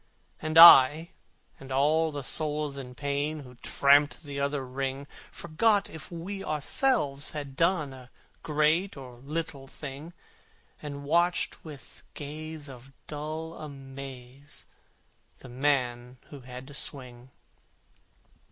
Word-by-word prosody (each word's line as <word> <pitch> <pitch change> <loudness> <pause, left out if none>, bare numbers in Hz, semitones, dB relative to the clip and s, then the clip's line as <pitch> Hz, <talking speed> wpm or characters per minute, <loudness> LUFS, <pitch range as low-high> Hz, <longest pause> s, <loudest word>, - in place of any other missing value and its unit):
And 155 +1 -1
I 160 0 +9 0.5
and 135 0 -11
all 155 +4 +2
the 145 -2 -5
souls 150 0 0
in 125 -2 -8
pain, 145 +2 -2
Who 125 -2 -13
tramped 140 +5 +3
the 140 -2 -6
other 140 -1 -1
ring, 135 +2 -4 0.3
Forgot 200 +6 +1
if 160 +3 -9
we 190 +4 -6
ourselves 150 - 0
had 140 -2 -6
done 160 -3 +1
A 130 -1 -13 0.3
great 155 +4 +1
or 125 -3 -11
little 140 0 -5
thing, 145 +4 -9 0.7
And 140 -1 -7
watched 170 +4 +1
with 145 -5 -12
gaze 155 +1 -7
of 135 0 -12
dull 155 +2 -5
amaze 135 -2 -9 0.7
The 130 - -13
man 125 -2 -1
who 145 - -9
had 125 0 -10
to 145 - -12
swing. 125 -3 -5
145 Hz, 120 wpm, -28 LUFS, 135-155 Hz, 0.7 s, I